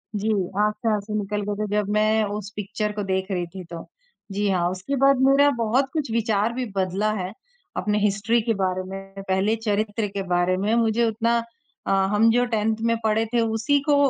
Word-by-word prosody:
जी 210 +2 0 0.3
आँख 210 0 +2
से 220 - +3
आँसू 210 +1 -4
निकल 205 +1 -2
गये - - -2
थे - - -5
जब 205 -1 0
मैं 215 +1 +3
उस 205 -1 -4
पिक्चर 210 +1 -3
को 205 - -3
देख 190 -1 -1
रही 180 -2 -1
थी 185 +2 -9
तो, 170 -1 -9 0.4
जी 205 +1 0
हाँ, 175 -2 +1
उसके 185 +9 -3
बाद 275 +1 +5
मेरा 280 +1 +5
बहुत 240 +4 +1
कुछ 295 -7 -2
विचार 220 -1 +1
भी 255 +1 -2
बदला 190 +3 0
है। 185 -3 -3 0.5
अपने 210 0 0
हिस्ट्री 210 +3 +1
के 225 +1 0
बारे 185 -1 -1
में 195 0 -8
पहले 190 +3 +2
चरित्र 210 0 0
के 200 0 -4
बारे 175 +1 +2
में 205 +4 0
मुझे 230 0 +2
उतना 230 +1 +1 0.5
अ, - - +1 0.2
हम 215 +2 +4
जो 245 +1 +3
टेंथ 220 -2 0
में 230 0 +2
पढ़े 220 +1 +2
थे 240 - +3
उसी 225 +5 +1
को 290 0 +2
210 Hz, 205 wpm, -24 LUFS, 195-225 Hz, 0.5 s, बाद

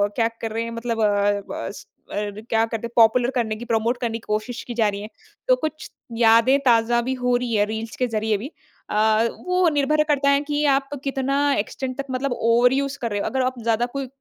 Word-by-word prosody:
क्या 230 -2 +2
कर 225 - -3
रहे 225 +1 -2
हैं 230 - -5
मतलब 230 0 -3
अ 205 -1 +2 0.3
अ, - - -4
स - - -11 0.3
क्या 215 +2 -1
करते 225 0 -4
हैं - - -18
पॉपुलर 240 +2 +5
करने 225 -3 0
की 230 +3 -8
प्रमोट 230 +1 0
करने 230 -2 -2
की 230 - -15
कोशिश 215 +3 -3
की 245 - -4
जा 225 -2 +3
रही 200 0 -5
है। 210 - -8 0.4
तो - - +5
कुछ 310 - -5 0.3
यादें 230 +3 +5
ताज़ा 235 0 +4
भी 255 +2 -2
हो 250 0 +3
रही 245 -1 -3
है 205 -1 +3
रील्स 220 +1 -5
के 250 - +1
ज़रिये 220 -2 0
भी। 250 +9 -7 0.4
अ, 220 +1 +3 0.2
वो 365 0 +2
निर्भर 300 +1 +2
करता 290 -2 +1
है 280 0 +3
कि 295 0 +1
आप 275 0 -5
कितना 275 0 -1 0.2
एक्सटेंट 255 +5 -4
तक 275 - -3
मतलब 260 +1 -2
ओवरयूज़ 250 +4 +2
कर 235 -2 -2
रहे 205 - -1
हो - - -2
अगर 265 - -1
आप 255 -1 -2
ज़्यादा 230 +1 +1
कोई 270 +2 -5
235 Hz, 225 wpm, -22 LUFS, 220-265 Hz, 0.4 s, पॉपुलर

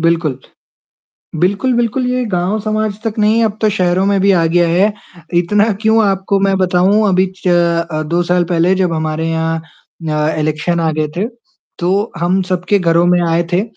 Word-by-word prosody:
बिल्कुल। 165 -5 0 1.0
बिल्कुल, 200 +8 +1
बिल्कुल 240 +2 0
ये 250 0 -1
गाँव 180 +4 0
समाज 215 -1 -2
तक 225 -1 -3
नहीं 215 +2 +3
अब 215 -1 -2
तो 215 - +2
शहरों 185 -2 +1
में 200 -1 +1
भी 200 +1 +3
आ 170 -3 +2
गया 175 +1 +2
है, 190 +5 +2 0.4
इतना 205 +6 +2
क्यों 220 0 +3
आपको 195 0 0
मैं 195 0 +1
बताऊँ 190 +3 +2
अभी 185 0 +2
च 185 - -4 0.4
अ, 155 0 -2
2 170 +3 -1
साल 175 0 +1
पहले 170 +2 +1
जब 185 -2 0
हमारे 160 0 -2
यहाँ 165 0 -1 0.5
अ, 150 +1 0
इलेक्शन 155 +3 -1
आ 165 -1 +1
गए 155 0 -1
थे, 195 +5 0 0.5
तो 195 +5 0
हम 175 +3 +1
सबके 185 +2 0
घरों 170 -2 +2
में 175 0 +3
आए 165 +1 +1
थे 180 +3 +2
180 Hz, 185 wpm, -15 LUFS, 170-205 Hz, 1.0 s, नहीं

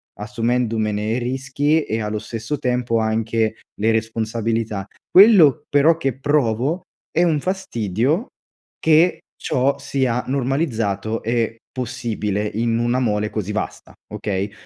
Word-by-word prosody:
assumendomene 110 -2 -1
i 120 - 0
rischi 135 +5 0
e, 110 +1 -2
allo 105 0 -2
stesso 115 +5 -4
tempo, 125 -3 0
anche 110 0 0 0.2
le 110 +2 +3
responsabilità. 110 -2 -2 0.2
Quello, 180 - +7
però, 145 +3 +4
che 135 -5 -2
provo, 145 - +1 0.3
è 170 - +2
un 160 -4 +2
fastidio, 145 - -1 0.5
che 160 +3 +4 0.2
ciò 135 +2 0
sia 125 -3 -1
normalizzato 120 -6 -1
e 115 0 0
possibile 115 -5 -3
in 115 0 +1
una 120 +2 +1
mole 105 -3 0
così 105 -2 -3
vasta, 105 - -5 0.2
okay, 100 -1 -3
115 Hz, 120 wpm, -21 LUFS, 110-135 Hz, 0.5 s, Quello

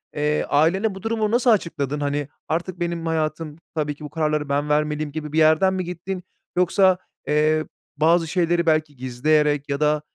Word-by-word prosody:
eee, 150 0 +1
ailene 190 +8 +2
bu 190 - -10
durumu 225 -1 0
nasıl 240 +1 +3
açıkladın? 150 - 0
Hani, 145 0 -1 0.2
"artık 175 +3 -3
benim 170 -1 -2
hayatım 155 -1 -2 0.2
tabii 150 -2 -1
ki, 150 - -13
bu 150 - -6
kararları 150 -2 -1
ben 145 +1 0
vermeliyim" 150 0 0
gibi 150 -1 -6
bir - - -1
yerden 160 +4 +4
mi 185 -1 -2
gittin 180 +1 -5 0.3
yoksa, 185 +1 +4 0.3
eee, 155 +1 +2 0.3
bazı 165 +2 +3
şeyleri 170 0 +1
belki 155 -2 +1
gizleyerek 145 +3 +1
ya 140 - -1
da, 150 0 +2
155 Hz, 170 wpm, -23 LUFS, 150-175 Hz, 0.3 s, yerden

